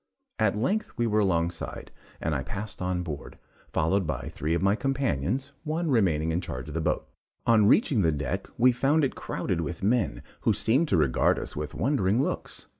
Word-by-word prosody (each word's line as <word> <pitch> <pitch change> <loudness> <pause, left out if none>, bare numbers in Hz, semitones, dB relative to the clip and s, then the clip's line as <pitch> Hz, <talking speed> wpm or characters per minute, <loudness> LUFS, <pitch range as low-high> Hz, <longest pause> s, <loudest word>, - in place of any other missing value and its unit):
At - - +2
length 200 - 0
we 120 - +1
were 110 -1 +2
alongside, 85 -4 -1 0.3
and 80 - -1
I 70 - 0
passed 100 +6 -6
on 90 -1 -1
board, 75 -5 -7 0.3
followed 90 +3 +1
by 70 -5 -3
three 80 +3 -1
of 85 - -1
my 100 +1 +4
companions, 135 - -1
one 160 0 -1
remaining 80 - +2
in 85 +2 0
charge 65 -5 -6
of - - -7
the 80 - -1
boat. 80 -1 -1 0.4
On 110 -3 +5
reaching 130 - +4
the 80 -3 +3
deck, 75 +6 -3
we 125 +2 +6
found 140 +5 +2
it 135 - +1
crowded 85 - -2
with 85 +2 -5
men, 105 - +1 0.2
who - - +2
seemed 135 +9 +2
to 95 - +2
regard 70 -6 +3
us - - -6
with 75 0 -5
wondering 115 -5 +1
looks. - - -3
95 Hz, 190 wpm, -27 LUFS, 80-125 Hz, 0.4 s, we